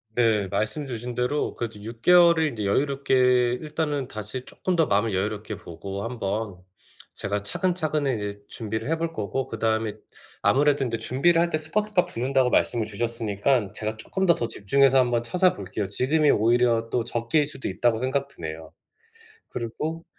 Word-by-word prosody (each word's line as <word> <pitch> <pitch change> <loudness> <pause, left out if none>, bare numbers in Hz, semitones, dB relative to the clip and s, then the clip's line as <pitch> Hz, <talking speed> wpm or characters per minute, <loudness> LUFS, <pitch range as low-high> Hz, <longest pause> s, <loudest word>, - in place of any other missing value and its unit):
네. 110 -5 +2
말씀 110 +9 -2
주신 120 0 -5
대로 125 +5 -1
그래도 110 -3 -5
6 115 +1 -8
개월을 170 -1 +6
인제 115 -8 -3
여유롭게 125 0 +2
일단은 150 -3 -2
다시 110 +4 -6
쪼끔 185 - -2
더 165 -3 +3
마음을 105 +1 +1
여유롭게 105 +1 -3
보고 95 +4 -7
한번 110 -4 -3 0.6
제가 100 0 -3
차근차근 155 - -1
이제 105 -1 -5
준비를 110 +3 -4
해 165 - +3
볼 165 0 -3
거고, 115 +4 -3
그다음에 110 -1 -1 0.5
아무래도 140 0 +3
인제 115 -2 -2
준비를 165 +7 +3
할 170 - +1
때 155 - 0
스퍼트가 190 +4 0
붙는다고 130 +1 +1
말씀을 115 -3 +2
주셨으니깐 110 0 0
제가 110 0 -4
쪼끔 190 - -2
더 170 - +7
더 115 - -2
집중해서 135 +6 +3
한번 120 -2 +2
찾아볼게요. 110 - 0
지금이 145 +9 +2
오히려 115 +1 +2
또 120 - +1
적기일 120 +6 0
수도 140 - -4
있다고 115 +4 +1
생각 135 +2 -1
드네요. 80 - -8 0.8
그리고 155 +8 -4
120 Hz, 370 characters per minute, -25 LUFS, 110-145 Hz, 0.8 s, 더